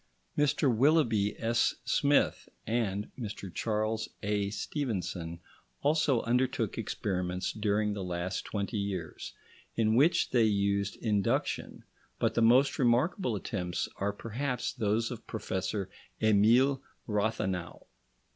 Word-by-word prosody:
Mr 145 -3 +2
Willoughby 115 -7 +3
S. 115 +1 +2
Smith 140 +2 +2 0.2
and 105 -3 -1
Mr 105 -6 -6
Charles 110 0 -1
A. 100 -1 0
Stevenson 95 - -3 0.4
also 145 -4 +3
undertook 120 -2 0
experiments 90 -4 -2
during 105 0 0
the 100 -2 -4
last 90 +1 -3
twenty 100 0 -3
years, 95 -5 -4 0.4
in 110 -1 +2
which 145 +9 +4
they 120 -2 +4
used 100 -1 +1
induction, 105 -4 0 0.3
but - - +1
the - - +1
most 125 +7 +5
remarkable 125 - +2
attempts 90 -4 -3
are 100 +1 0
perhaps 125 +5 -3
those 110 -1 0
of 120 -2 -8
Professor 100 -2 -3 0.3
Emile 115 +6 +4 0.2
Rathenau. 105 -5 -2
110 Hz, 110 wpm, -30 LUFS, 100-120 Hz, 0.4 s, most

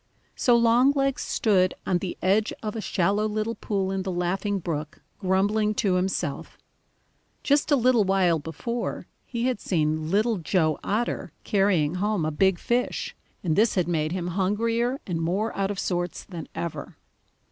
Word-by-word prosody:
So 245 - +4
Longlegs 260 +4 +3
stood 185 -4 +2
on 180 -2 +1
the 180 -1 -5
edge 200 +4 +2
of 215 0 -3
a 220 - -3
shallow 205 +2 +1
little 215 +1 -2
pool 195 -4 -2
in 195 0 -1
the 190 0 -3
Laughing 185 +3 -1
Brook, 155 -4 -4 0.2
grumbling 205 +3 +1
to 195 -3 +1
himself. 180 -5 -2 0.9
Just 285 +1 +2
a 290 - +5
little 245 -3 +4
while 185 -4 +2
before, 230 - -4 0.2
he 235 -1 -2
had 255 -4 0
seen 155 -2 0
Little 215 +4 +2
Joe 160 -3 +1
Otter 225 +4 -2
carrying 185 -5 +2
home 205 -5 +1
a 155 - 0
big 190 +4 +2
fish, 245 +5 -1 0.3
and 160 -4 +1
this 215 +2 +3
had 180 -3 +1
made 155 -3 0
him 175 -1 -2
hungrier 230 +7 0
and 170 -3 -2
more 195 +7 -1
out 195 0 0
of 205 - -3
sorts 175 -1 -2
than 170 -5 -8
ever. 170 -2 -5
195 Hz, 160 wpm, -26 LUFS, 175-220 Hz, 0.9 s, a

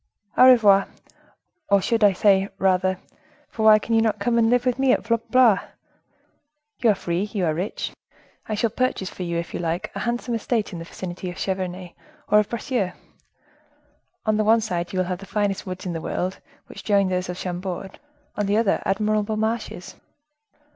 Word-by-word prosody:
"Au 255 - +8
revoir! 205 -6 +5 0.8
I 200 0 +5
should 230 +4 0
rather 205 -3 +5
say, 195 0 +3 1.0
for 220 - -4
why 215 0 +9
can 225 +2 -3
you 225 - +4
not 220 -2 +1
come 235 +3 +1
and 225 -1 +3
live 245 +1 +2
with 250 0 0
me 270 -1 +3
at - - 0 0.3
Blois? 240 -5 +5 1.2
You 235 - +3
are 210 - +4
free, 175 -1 -2
you 205 -3 -2
are 160 - +1
rich, 180 +6 -4 0.6
I 215 - 0
shall 225 +1 0
purchase 230 -6 -1
for - - -10
you, 170 -1 -2
if 170 0 -5
you - - -3
like, 170 0 -3
a - - -5
handsome 240 0 -2
estate 225 -2 -1
in 170 - -6
the 165 - -7
vicinity 180 +1 -6
of 180 - -7
Cheverny 185 -2 -4 0.3
or 210 - +6
of 210 - 0
Bracieux. 235 -5 -2 1.3
On 215 -1 +2
the 215 - +2
one 225 +2 +4
side 175 -5 -3
you 185 - -4
will 185 - +1
have 180 0 -4
the 195 - -11
finest 205 -1 -1
woods 185 0 -6
in 180 - -3
the 165 - -4
world, 185 +3 -3 0.3
which - - -11
join 200 -2 +2
those 180 0 -2
of 180 - -4
Chambord; 185 +1 -5 0.4
on 210 -1 -1
the 205 +1 +2
other, 220 -3 +2
admirable 215 +1 0
marshes. 220 -4 -3
200 Hz, 190 wpm, -23 LUFS, 185-225 Hz, 1.3 s, why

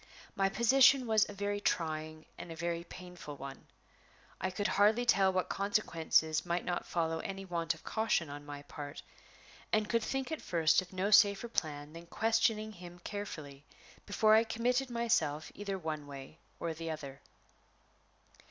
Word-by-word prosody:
My 195 0 +2
position 255 +5 +5
was 220 -2 +3
a - - -6
very 205 +1 -2
trying 155 -3 -2
and 170 - -9
a - - -6
very 170 0 -2
painful 175 -5 -9
one. 135 0 -9 0.7
I 185 - -1
could 200 +2 -1
hardly 215 +4 +3
tell 195 -5 +4
what 185 -1 0
consequences 165 -6 +1
might 175 0 -2
not 175 -1 -2
follow 165 -1 -1
any 195 +2 -5
want 170 -2 -1
of 160 - -17
caution 220 -7 0
on 145 +1 -8
my 145 -1 -8
part, 145 0 -8 0.7
and 215 -1 +2
could 230 0 +1
think 270 +5 -2
at 315 - -3
first 165 0 +3
of 185 - -12
no 190 +2 -1
safer 205 +1 +6
plan 150 -8 -3
than 170 +1 -10
questioning 220 +1 +1
him 175 -3 -11
carefully 155 -9 -6 0.4
before 215 +1 +4
I 220 +1 +7
committed 245 +4 0
myself 190 -11 0
either 200 -1 -4
one 155 -4 -4
way 140 +3 -10 0.2
or 165 -1 -2
the 165 +1 -6
other. 140 -4 -6
180 Hz, 160 wpm, -33 LUFS, 160-215 Hz, 0.7 s, I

